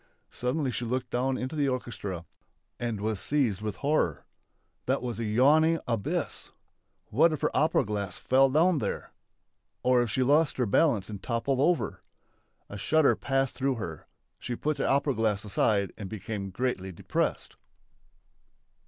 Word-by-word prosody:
Suddenly 130 +2 -1
she 120 - -3
looked 125 +2 -2
down 130 +1 0
into 130 +5 -4
the 145 -2 +1
orchestra 100 -9 -4 0.5
and 115 -3 -2
was 105 -1 -1
seized 120 -9 0
with 105 -2 -3
horror. 140 - 0 0.6
That - - +1
was 120 -3 -4
a 115 - -1
yawning 150 +9 +4
abyss! 115 -5 -2 0.6
What 160 +9 +5
if 155 - -3
her - - 0
opera 155 -1 +3
glass 100 -3 -3
fell 135 +1 +4
down 160 +4 +3
there! 105 - -4 0.7
Or 125 -1 +4
if 120 - -1
she 130 +5 +1
lost 145 +3 +3
her 125 - +2
balance 110 - +2
and 105 -3 -7
toppled 125 +4 -1
over! 170 +4 +1 0.7
A 105 - -8
shudder 155 +6 +3
passed 135 -1 0
through 135 0 0
her. 85 - -6 0.3
She 120 - -4
put 155 +4 -1
the - - 0
opera 140 +1 +2
glass 110 -3 0
aside 100 0 +1
and 100 -3 -5
became 105 -1 -5
greatly 95 -2 -2
depressed. 85 - -2
125 Hz, 155 wpm, -28 LUFS, 105-140 Hz, 0.7 s, What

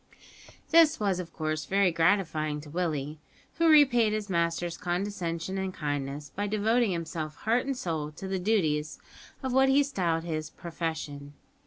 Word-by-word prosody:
This 330 -2 +6
was 195 -4 0
of 170 -2 -6
course 155 -2 -3
very 195 -1 +3
gratifying 165 -3 +1
to 145 -1 -12
Willie, 155 -3 -2 0.4
who 330 -1 +5
repaid 250 -8 +5
his 215 -2 -3
master's 170 0 0
condescension 180 0 -3
and 190 0 -2
kindness 145 -2 -4
by 205 +1 -1
devoting 220 +3 +2
himself 165 -3 -4
heart 235 +4 +2
and 275 -2 -2
soul 160 -7 -3
to 190 - -7
the 190 0 -2
duties 160 -7 0 0.5
of 260 -1 -2
what 265 +1 +5
he 280 +2 +5
styled 175 -12 -1
his 155 -2 -3
"profession." 160 -4 -5
175 Hz, 155 wpm, -28 LUFS, 155-210 Hz, 0.5 s, This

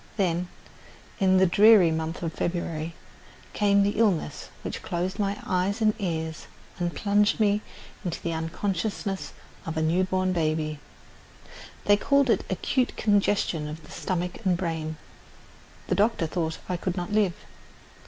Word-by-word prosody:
Then, 180 -3 +1 0.7
in 190 -2 +4
the 190 - +6
dreary 200 -1 +6
month 160 +2 -3
of 165 -1 -2
February, 170 -2 -3 0.6
came 200 -1 +4
the 205 +2 0
illness 180 -9 +1
which - - -5
closed 180 +4 -3
my 200 0 0
eyes 185 +4 0
and 215 -1 +3
ears 160 -4 -3 0.3
and 175 -1 -1
plunged 205 +1 +2
me 210 -1 +3 0.4
into 175 -4 -3
the 170 - -3
unconsciousness 195 +4 -2 0.3
of 160 0 -5
a - - +1
new 170 +4 +2
born 185 0 0
baby. 155 -2 -1 1.1
They 205 0 +5
called 280 +3 +3
it - - +2
acute 250 +7 0
congestion 200 -6 +1
of 155 +1 -7
the - - -14
stomach 180 +2 -3
and 185 -3 +2
brain. 160 -3 -3 0.9
The - - -1
doctor 210 -4 +2
thought 160 -1 -2
I 180 - -1
could 180 +1 -3
not 175 +1 -3
live. 205 -4 +2
185 Hz, 145 wpm, -26 LUFS, 165-205 Hz, 1.1 s, the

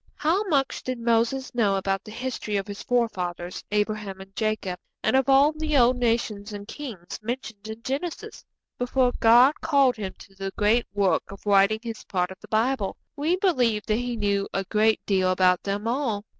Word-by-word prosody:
How 325 +7 +1
much 280 -8 0
did 255 -1 -3
Moses 235 +3 +1
know 210 -5 +2
about 195 0 -1
the 215 - -11
history 230 -2 -3
of 195 - -2
his 205 0 -7
forefathers, 185 -8 -2
Abraham 210 -2 -1
and 195 +1 -13
Jacob, 215 -5 -2 0.2
and - - +2
of 265 0 +2
all 275 +2 +6
the 310 -1 -1
old 245 0 +5
nations 225 -3 -1
and 205 0 -7
kings 220 - -7
mentioned 220 -2 -5
in 220 +1 -8
Genesis, 345 +10 -4 0.4
before 250 0 +2
God 245 +6 +6
called 280 -6 +3
him 195 -3 -5
to 195 - -15
the 195 0 -5
great 220 +3 +2
work 195 -5 +1
of 200 - -12
writing 200 +2 +4
his 230 -2 -6
part 180 -2 -1
of 190 - -11
the - - -12
Bible? 220 -2 0 0.2
We 310 +4 +1
believe 250 - +1
that 215 - +1
he 245 0 -2
knew 200 -2 0
a 195 - 0
great 215 +2 +1
deal 185 -2 +2
about 185 -1 +3
them 205 +2 -3
all. 230 -5 -1
220 Hz, 185 wpm, -25 LUFS, 200-255 Hz, 0.4 s, all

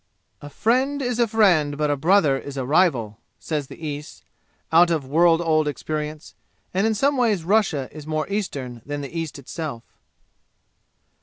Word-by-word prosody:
"A 145 - -9
friend 255 - +1
is 245 -3 -2
a 235 - +4
friend, 175 -10 +3
but 150 -1 +1
a - - +2
brother 155 -1 +3
is 140 +1 -7
a 130 - -2
rival," 130 - +2 0.2
says 150 -4 -3
the - - -11
East, 145 0 -7 0.5
out 170 +2 +6
of 160 -5 0
world 165 +4 +3
old 155 -2 +2
experience, 150 +1 -4 0.4
and 195 +4 +2
in 220 - +1
some 275 +6 +2
ways 220 -8 +1
Russia 175 -8 +1
is 155 0 -10
more 155 0 -2
eastern 140 - -4
than 145 0 -5
the 140 +4 -8
East 165 -3 -4
itself. 140 -3 -6
155 Hz, 165 wpm, -23 LUFS, 145-200 Hz, 0.5 s, out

